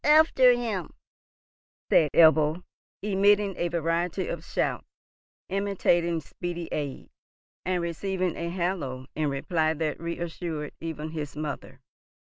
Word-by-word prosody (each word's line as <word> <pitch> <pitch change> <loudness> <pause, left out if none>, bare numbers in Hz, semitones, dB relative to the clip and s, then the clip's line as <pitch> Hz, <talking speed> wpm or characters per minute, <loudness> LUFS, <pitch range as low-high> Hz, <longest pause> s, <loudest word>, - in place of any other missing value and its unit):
"Up - - 0
after 300 -5 +7
him!" 225 -8 -3 1.0
said 155 - +5
Ebbo, 160 +1 +5 0.4
emitting 200 0 +3
a 175 - 0
variety 170 +2 -1
of 165 -1 -4
shouts - - -2 0.6
intimating 175 -4 +1
speedy 175 +2 -5
aid, 145 -3 -4 0.5
and 180 -1 0
receiving 185 +1 -1
a 170 0 -3
halloo 170 -8 -2
in 155 -1 0
reply 155 +3 0
that 155 -1 -2
reassured 170 -2 -4
even 160 -1 -5
his 150 -3 -5
mother. 150 -1 -5
170 Hz, 115 wpm, -27 LUFS, 155-185 Hz, 1.0 s, after